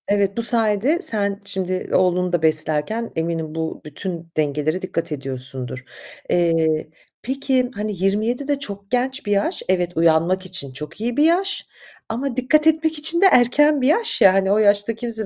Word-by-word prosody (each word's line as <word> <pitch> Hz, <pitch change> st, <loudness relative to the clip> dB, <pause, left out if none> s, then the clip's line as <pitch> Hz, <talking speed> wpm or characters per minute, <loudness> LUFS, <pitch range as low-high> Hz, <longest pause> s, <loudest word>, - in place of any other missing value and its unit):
Evet, 200 Hz, 0 st, 0 dB
bu -, -, 0 dB
sayede 230 Hz, -, +2 dB
sen 200 Hz, -, +1 dB
şimdi 185 Hz, -2 st, -4 dB
oğlunu 180 Hz, -1 st, +1 dB
da 175 Hz, -, +1 dB
beslerken 160 Hz, +8 st, 0 dB
eminim 160 Hz, -1 st, -3 dB
bu 160 Hz, 0 st, -4 dB
bütün 165 Hz, +2 st, -7 dB
dengelere 155 Hz, +3 st, -1 dB
dikkat 170 Hz, -2 st, -4 dB
ediyorsundur. 130 Hz, -2 st, -1 dB, 0.5 s
Eee, 165 Hz, -3 st, +1 dB, 0.3 s
peki, 260 Hz, -1 st, -1 dB
hani, 210 Hz, +1 st, -3 dB
27'de 240 Hz, +8 st, -1 dB
çok 200 Hz, -6 st, -7 dB
genç 260 Hz, +2 st, -1 dB
bir 205 Hz, -, -3 dB
yaş. 200 Hz, 0 st, 0 dB
Evet, 180 Hz, -2 st, +1 dB
uyanmak 170 Hz, +3 st, +2 dB
için 185 Hz, -7 st, -4 dB
çok 150 Hz, +8 st, -8 dB
iyi 240 Hz, +2 st, -3 dB
bir 295 Hz, -, +4 dB
yaş, 360 Hz, +5 st, +2 dB, 0.4 s
ama 245 Hz, +3 st, -3 dB
dikkat 300 Hz, +5 st, +2 dB
etmek 320 Hz, 0 st, +1 dB
için 315 Hz, +4 st, +4 dB
de -, -, +6 dB
erken 285 Hz, +4 st, +4 dB
bir 255 Hz, -, +2 dB
yaş 450 Hz, +10 st, +2 dB
ya. 190 Hz, -1 st, +7 dB
Hani, 195 Hz, 0 st, +1 dB
o 205 Hz, -, +3 dB
yaşta 205 Hz, +1 st, +2 dB
kimse 225 Hz, -1 st, -4 dB
200 Hz, 165 wpm, -20 LUFS, 165-250 Hz, 0.5 s, ya